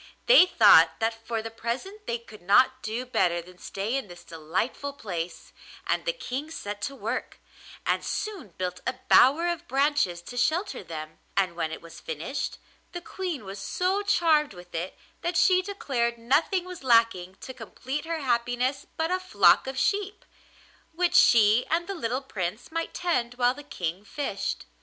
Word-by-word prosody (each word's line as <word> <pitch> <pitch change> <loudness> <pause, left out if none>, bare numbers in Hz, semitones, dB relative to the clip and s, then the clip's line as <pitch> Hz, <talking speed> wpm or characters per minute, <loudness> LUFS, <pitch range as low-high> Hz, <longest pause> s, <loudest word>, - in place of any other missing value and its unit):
They 480 -7 +8
thought - - +7
that 225 0 -2
for 225 -1 -2
the 225 - -6
present 260 - -5
they 235 - 0
could 220 -3 -15
not 255 +8 +4
do 225 +4 -3
better 180 -8 +1
than 180 +1 -13
stay 205 +6 -3
in 270 -5 -2
this 175 -1 -12
delightful 175 - -3
place, 175 -9 -6 0.3
and - - 0
the - - +2
King 300 - -5
set 205 -10 -6
to 275 - -11
work, - - -4 0.5
and - - +1
soon 415 - -4
built 180 -1 -3
a - - 0
bower 300 +7 +6
of 345 0 -3
branches 270 - +1
to 245 +8 -9
shelter 345 - 0
them; 155 -2 -8 0.2
and 185 -3 +2
when 160 -2 -2
it 160 - -7
was 165 - -11
finished 160 - -4 0.4
the 350 - -5
Queen 350 - -5
was 195 +1 -7
so 365 - 0
charmed 320 - +2
with 175 0 -13
it 170 +3 -4 0.2
that 345 0 -1
she 365 0 +5
declared 275 - -2
nothing 295 +10 +1
was 365 -5 -9
lacking 230 -7 +3
to 260 - -7
complete 270 +4 -6
her 330 -1 -3
happiness 245 +2 0
but 320 +2 0
a 370 - +1
flock 370 -6 +4
of 265 0 -5
sheep, 405 +7 -1 0.7
which 350 +1 +1
she 225 +1 +6
and 335 +2 +1
the 395 - -3
little 255 -5 -2
Prince 205 - -4
might 330 0 -3
tend 250 -9 -1
while 245 0 +3
the 290 - -10
King 190 - -4
fished. 210 -4 -4
250 Hz, 175 wpm, -27 LUFS, 200-330 Hz, 0.7 s, They